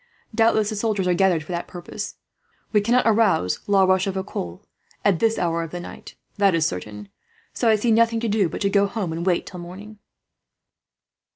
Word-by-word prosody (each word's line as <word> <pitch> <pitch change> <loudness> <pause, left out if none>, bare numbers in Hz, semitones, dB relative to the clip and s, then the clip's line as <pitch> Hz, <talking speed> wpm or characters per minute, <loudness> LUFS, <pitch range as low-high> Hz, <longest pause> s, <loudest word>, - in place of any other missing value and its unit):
Doubtless 220 -1 +3
the - - -3
soldiers 205 -3 -1
are 180 - +3
gathered 175 -3 +2
for 155 - -9
that 175 0 -3
purpose. 175 -1 -7 0.6
We 210 - +4
cannot 240 +4 +2
arouse 210 - +2
La 200 -1 +4
Rochefoucauld, 190 - -1 0.4
at 195 -5 +3
this 225 0 +2
hour 170 -1 0
of 165 - -5
the 175 - -6
night, 175 - -10 0.2
that 200 -3 +3
is 160 -2 +2
certain; 105 +1 -5 0.4
so 235 - +1
I 220 - +5
see 225 +2 +1
nothing 230 0 +3
to 235 - -1
do 205 -4 +1
but - - -6
to 200 - +2
go 200 0 +3
home, 200 -5 -3
and 165 +1 -4
wait 180 -1 +1
till 180 - -9
morning." 200 +5 -10
195 Hz, 190 wpm, -23 LUFS, 175-215 Hz, 0.6 s, I